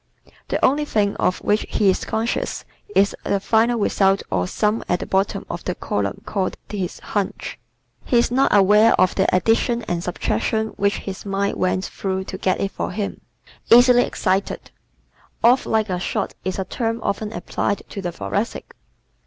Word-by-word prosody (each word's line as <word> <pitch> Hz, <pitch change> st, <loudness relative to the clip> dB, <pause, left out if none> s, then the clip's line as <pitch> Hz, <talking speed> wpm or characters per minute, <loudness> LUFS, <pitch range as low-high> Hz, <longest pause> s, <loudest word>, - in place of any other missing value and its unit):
The -, -, 0 dB
only 290 Hz, +3 st, +2 dB
thing 205 Hz, -7 st, +1 dB
of 180 Hz, -, +1 dB
which 210 Hz, +1 st, +2 dB
he 200 Hz, -2 st, +3 dB
is -, -, -3 dB
conscious 225 Hz, +2 st, -2 dB, 0.3 s
is 200 Hz, +1 st, +3 dB
the 200 Hz, -, 0 dB
final 230 Hz, +4 st, +2 dB
result 195 Hz, -2 st, +2 dB
or 90 Hz, -, 0 dB
sum 210 Hz, -, 0 dB
at 180 Hz, -, +1 dB
the -, -, -4 dB
bottom 195 Hz, +1 st, 0 dB
of -, -, -6 dB
the -, -, -2 dB
column -, -, -2 dB
called 190 Hz, -3 st, -2 dB
his 190 Hz, -4 st, -4 dB
"hunch." 205 Hz, -2 st, -4 dB, 0.4 s
He 245 Hz, -, +1 dB
is 235 Hz, -, +3 dB
not 265 Hz, +2 st, +3 dB
aware 210 Hz, +3 st, +5 dB
of 185 Hz, 0 st, +4 dB
the 190 Hz, -, +2 dB
addition 230 Hz, +4 st, +2 dB
and 175 Hz, -4 st, -3 dB
subtraction 200 Hz, -, -1 dB
which 200 Hz, -1 st, 0 dB
his 195 Hz, -1 st, -6 dB
mind 200 Hz, 0 st, -1 dB
went 185 Hz, +1 st, 0 dB
through 190 Hz, -1 st, -3 dB
to 190 Hz, 0 st, -7 dB
get 185 Hz, -, +1 dB
it 195 Hz, -, -1 dB
for -, -, -3 dB
him. 205 Hz, -2 st, -4 dB, 0.5 s
Easily 245 Hz, +1 st, +7 dB
Excited 195 Hz, -3 st, -1 dB, 0.7 s
¶ -, -, +7 dB
"Off 250 Hz, +2 st, +4 dB
like 220 Hz, -2 st, +1 dB
a 180 Hz, -, -1 dB
shot" 200 Hz, +2 st, -2 dB
is 185 Hz, -1 st, -2 dB
a 190 Hz, -, -2 dB
term 230 Hz, +3 st, -2 dB
often 210 Hz, +1 st, -2 dB
applied 200 Hz, +2 st, -2 dB
to 200 Hz, -, -6 dB
the 175 Hz, -2 st, -3 dB
Thoracic. 200 Hz, +6 st, -3 dB
200 Hz, 180 wpm, -21 LUFS, 190-225 Hz, 0.7 s, Easily